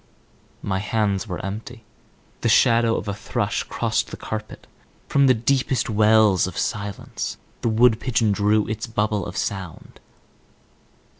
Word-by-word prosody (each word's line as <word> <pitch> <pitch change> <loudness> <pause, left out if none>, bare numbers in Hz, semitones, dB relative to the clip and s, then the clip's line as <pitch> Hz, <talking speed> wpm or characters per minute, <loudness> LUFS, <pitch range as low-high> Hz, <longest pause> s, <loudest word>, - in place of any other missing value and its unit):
My 95 -1 -1
hands 105 -1 -1
were 90 -3 -4
empty. 110 +4 -7 0.6
The - - +1
shadow 115 -1 +4
of - - -4
a 100 - -1
thrush 100 - -2
crossed - - -1
the - - -8
carpet; 110 0 -6 0.4
from 140 -1 +3
the 130 - +5
deepest 130 +1 0
wells 105 -3 +4
of 90 - -7
silence 100 -1 -4 0.2
the 115 - +1
wood 110 0 +4
pigeon 115 -4 +1
drew 105 +1 +2
its 110 +2 -4
bubble 105 -2 -1
of 90 - -7
sound. 95 -4 -5
110 Hz, 140 wpm, -23 LUFS, 100-115 Hz, 0.6 s, the